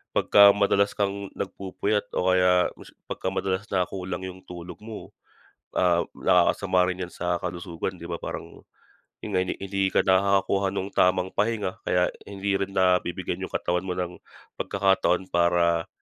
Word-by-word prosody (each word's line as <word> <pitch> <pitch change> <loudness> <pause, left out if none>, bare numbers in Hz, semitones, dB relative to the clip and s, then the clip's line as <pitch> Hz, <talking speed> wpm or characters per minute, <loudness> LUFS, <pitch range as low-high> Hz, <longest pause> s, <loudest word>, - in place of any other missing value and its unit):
pagka 100 0 +7
madalas 100 0 +2
kang 100 -1 -2
nagpupuyat 100 +2 -2
o 90 0 +2
kaya 90 -1 +4
mas - - -13 0.2
pagka - - -3
madalas 95 0 -1
na 90 -2 +1
kulang 95 -1 -5
yung 95 0 -9
tulog 90 0 -9
mo, 110 -1 -9 0.7
ah, 85 -1 +3
nakakasama 90 +1 +3
rin 90 0 -3
yan 90 - -16
sa 90 0 -1
kalusugan, 85 +1 -4
di 85 - -8
ba? 85 - -3
Parang - - -7 0.6
yun 105 - -5
nga, - - +4
hin 90 - -3
hindi 95 0 -1
ka - - +4
nakakakuha 100 0 +3
ng 100 0 -3
tamang 90 0 +3
pahinga, 105 -3 -1
kaya 90 0 +3 0.2
hindi 100 0 -2
rin 100 0 -3
na 90 -1 +4
bibigyan 85 +1 -4
yung - - -13
katawan 90 +1 -1
mo 90 - -1
ng 90 -1 -3 0.4
pagkakataon 95 -1 +1
para 85 -1 +2
95 Hz, 160 wpm, -26 LUFS, 90-100 Hz, 0.7 s, pagka